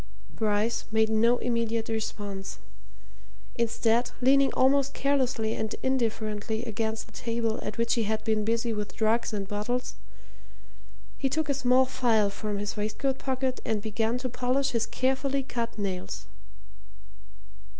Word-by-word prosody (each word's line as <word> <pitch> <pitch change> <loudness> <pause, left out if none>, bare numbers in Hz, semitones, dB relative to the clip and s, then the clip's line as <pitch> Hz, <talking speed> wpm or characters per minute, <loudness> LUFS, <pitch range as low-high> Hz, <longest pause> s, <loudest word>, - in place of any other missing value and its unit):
Bryce 215 +1 0
made 220 0 +3
no 230 +3 +4
immediate 230 -2 0
response. 205 -3 -4 1.0
Instead, 235 +1 +2
leaning 270 +1 +5
almost 275 +1 +3
carelessly 255 -5 +1
and 220 0 -2
indifferently 225 -3 -1
against 220 -1 -2
the 225 - -19
table 230 -1 -1
at - - -5
which 230 0 +2
he 230 -2 +1
had 215 +1 -1
been 220 -1 +1
busy 230 +1 0
with 210 -1 -4
drugs 225 +2 +2
and 200 -2 -3
bottles, 215 +5 -2 1.3
he 270 - +1
took 315 +2 -1
a - - +4
small 260 -1 +4
file 225 -5 +2
from 210 0 -3
his 205 0 -3
waistcoat 240 +6 -1
pocket 260 -1 -1
and 215 -2 -1
began 225 +2 0
to 255 +1 -3
polish 255 +3 0
his 230 -2 0
carefully 270 +1 0
cut 235 -3 -3
nails. 190 - -3
230 Hz, 140 wpm, -28 LUFS, 220-255 Hz, 1.3 s, leaning